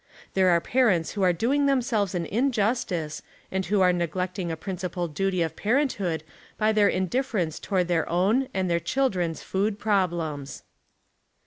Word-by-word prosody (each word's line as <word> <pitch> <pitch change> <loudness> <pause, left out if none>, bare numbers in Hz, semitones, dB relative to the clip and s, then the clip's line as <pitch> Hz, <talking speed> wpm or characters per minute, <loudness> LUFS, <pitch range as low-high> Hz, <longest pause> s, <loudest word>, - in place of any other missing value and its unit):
There 190 -1 +4
are 170 -1 +4
parents 195 -5 +2
who 205 - -4
are 185 -1 +5
doing 270 - +1
themselves 230 -8 +1
an 170 -1 -1
injustice 210 - 0 0.3
and 190 0 -1
who 200 +1 +2
are 180 -1 +5
neglecting 180 +1 -2
a 160 - -4
principal 180 0 -4
duty 185 +3 0
of 160 - -4
parenthood 205 - 0 0.3
by 215 0 +2
their 210 -2 +4
indift'erence 190 - -1
toward 185 -3 0
their 170 -2 0
own 205 +10 +2
and 190 -1 -1
their 170 -1 +1
cliildren's 180 -10 -1
food 200 +2 -1
problems. 170 -9 -1
190 Hz, 150 wpm, -26 LUFS, 175-215 Hz, 0.3 s, are